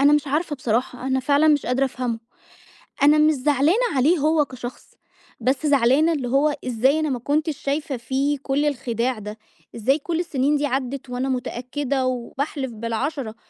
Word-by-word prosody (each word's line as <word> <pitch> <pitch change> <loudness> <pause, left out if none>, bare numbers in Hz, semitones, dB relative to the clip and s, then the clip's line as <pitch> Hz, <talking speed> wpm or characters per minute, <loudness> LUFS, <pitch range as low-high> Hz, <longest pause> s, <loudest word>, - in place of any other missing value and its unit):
أنا 285 +1 +6
مش 295 0 +2
عارفة 295 +1 -1
بصراحة، 250 +1 -2
أنا 265 0 +1
فعلًا 285 +4 +3
مش 295 -2 +3
قادرة 255 +2 +1
أفهمه. 250 -3 -3 0.8
أنا 295 +1 +6
مش 305 +1 +5
زعلانة 300 - +2
عليه 290 +7 +3
هو 305 0 +2
كشخص، 255 -2 -9 0.5
بس 265 +6 0
زعلانة 280 +4 +4
اللي 275 -5 -2
هو 280 +4 +2
إزاي 255 +5 +2
أنا 310 -1 0
ما 255 - -2
كنتش 295 +3 -1
شايفة 285 0 -2
فيه 270 +4 -1
كل 285 +2 0
الخداع 250 -3 -1
ده، 210 +1 -7 0.4
إزاي 260 +6 +1
كُل 330 +2 -2
السنين 295 -4 +1
دي 290 - 0
عدّت 265 -1 -3
وأنا 250 +2 -2
متأكدة 260 +2 -2
وباحلف 265 +2 -3
بال10، 230 +2 -3
275 Hz, 165 wpm, -23 LUFS, 250-295 Hz, 0.8 s, أنا